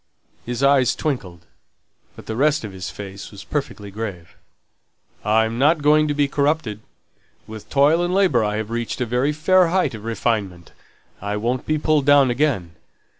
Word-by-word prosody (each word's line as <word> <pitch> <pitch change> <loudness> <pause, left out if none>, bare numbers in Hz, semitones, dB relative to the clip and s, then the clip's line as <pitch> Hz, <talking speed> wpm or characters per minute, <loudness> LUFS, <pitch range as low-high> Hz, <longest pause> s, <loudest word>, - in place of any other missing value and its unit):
His 125 +2 -3
eyes 140 -3 +4
twinkled, 90 - -4 0.7
but - - -12
the 110 - -4
rest 150 +3 +2
of 105 - -6
his 95 -1 -6
face 100 -1 -9
was 100 -2 -11
perfectly 125 -9 -5
grave. 95 -6 -7 0.9
"I'm 110 +2 +1
not 150 +2 +3
going 150 +1 +4
to 145 - -1
be 145 -1 +2
corrupted. 140 -7 -1 0.7
With 110 -1 -10
toil 150 +5 +3
and 175 - -1
labour 185 - +3
I've 105 +1 -2
reached 120 +1 -3
a 125 - 0
very 125 +5 0
fair 180 +4 +3
height 170 -6 +1
of 110 -2 -8
refinement. 105 -6 -2 0.5
I 100 +1 -3
won't 120 +4 -2
be 155 - +1
pulled 150 -2 +1
down 140 -3 +5
again." 120 - 0
125 Hz, 165 wpm, -21 LUFS, 105-150 Hz, 0.9 s, down